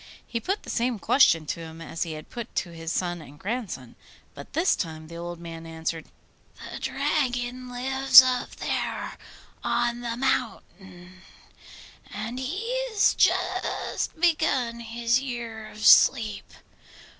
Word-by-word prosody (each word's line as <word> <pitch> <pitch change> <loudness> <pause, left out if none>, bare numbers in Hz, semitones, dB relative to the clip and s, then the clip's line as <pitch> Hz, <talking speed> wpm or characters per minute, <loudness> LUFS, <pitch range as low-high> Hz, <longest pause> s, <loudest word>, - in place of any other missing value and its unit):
He 230 - -3
put 390 - -2
the - - -10
same 240 0 0
question 170 - +4
to 160 - -4
him 165 0 -9
as 165 0 -7
he 165 -2 -1
had 155 0 -10
put 235 -2 -7
to 175 - -2
his 165 -1 -5
son 175 -2 -2
and 145 -1 -13
grandson; 195 - -5 0.4
but - - -11
this 340 +4 +3
time 160 -2 -5
the 170 - -9
old 170 0 -6
man 165 -1 -8
answered, 160 0 -4 0.6
'The - - -6
Dragon 250 -3 -1
lives 265 +1 +7
up 255 -1 +2
there - - -3 0.5
on 240 0 0
the 235 -1 -3
mountain, 190 -8 -3 0.9
and 225 +4 -5
he 350 - -3 0.2
has 430 -3 +3
just - - 0
begun 305 -8 +1
his 235 +1 0
year 235 -4 -6
of 215 0 -7
sleep. 220 -5 +5
230 Hz, 140 wpm, -26 LUFS, 170-255 Hz, 0.9 s, lives